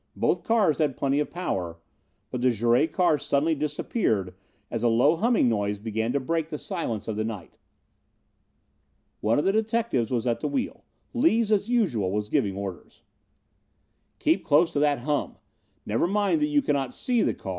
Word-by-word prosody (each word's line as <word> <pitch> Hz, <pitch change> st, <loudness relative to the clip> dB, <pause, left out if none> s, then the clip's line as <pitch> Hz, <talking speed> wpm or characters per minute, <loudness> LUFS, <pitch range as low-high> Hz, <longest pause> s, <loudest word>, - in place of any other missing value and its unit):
Both -, -, +1 dB
cars 210 Hz, -10 st, +2 dB
had 150 Hz, -4 st, 0 dB
plenty 140 Hz, +1 st, +1 dB
of 150 Hz, -, -1 dB
power, 90 Hz, -, -3 dB, 0.5 s
but 125 Hz, -, -3 dB
the 130 Hz, -, +4 dB
Jouret 120 Hz, +5 st, +2 dB
car 175 Hz, -5 st, +2 dB
suddenly 150 Hz, +4 st, +1 dB
disappeared 145 Hz, -, -1 dB, 0.4 s
as 115 Hz, -, -2 dB
a 120 Hz, -, +2 dB
low 125 Hz, +8 st, +4 dB
humming 225 Hz, -, +2 dB
noise 105 Hz, -3 st, 0 dB
began 110 Hz, +2 st, -2 dB
to 140 Hz, -, +1 dB
break 160 Hz, +4 st, -2 dB
the 150 Hz, -, -4 dB
stillness 145 Hz, -, -4 dB
of 110 Hz, -, -2 dB
the 110 Hz, -, 0 dB
night. 105 Hz, -6 st, -6 dB, 1.6 s
One 110 Hz, +2 st, +1 dB
of 145 Hz, -, +1 dB
the 195 Hz, -, +4 dB
detectives 220 Hz, -, 0 dB
was 125 Hz, -2 st, -1 dB
at 120 Hz, -2 st, 0 dB
the -, -, -2 dB
wheel. 270 Hz, -3 st, -3 dB, 0.3 s
Lees, 235 Hz, -5 st, +2 dB
as 210 Hz, +1 st, +1 dB
usual, 145 Hz, -, +1 dB
was 105 Hz, +1 st, -2 dB
giving 105 Hz, -10 st, 0 dB
orders: 100 Hz, -3 st, -7 dB, 1.1 s
"Keep -, -, +1 dB
close 165 Hz, +4 st, +3 dB
to 145 Hz, -, -1 dB
that 145 Hz, -1 st, +3 dB
hum. 145 Hz, +3 st, -1 dB, 0.5 s
Never 115 Hz, +10 st, +1 dB
mind 205 Hz, -, +1 dB
that 300 Hz, -, +3 dB
you 295 Hz, -1 st, +2 dB
cannot 135 Hz, -, -1 dB
see 245 Hz, -3 st, +1 dB
the -, -, +1 dB
car. -, -, -8 dB
145 Hz, 175 wpm, -26 LUFS, -, 1.6 s, the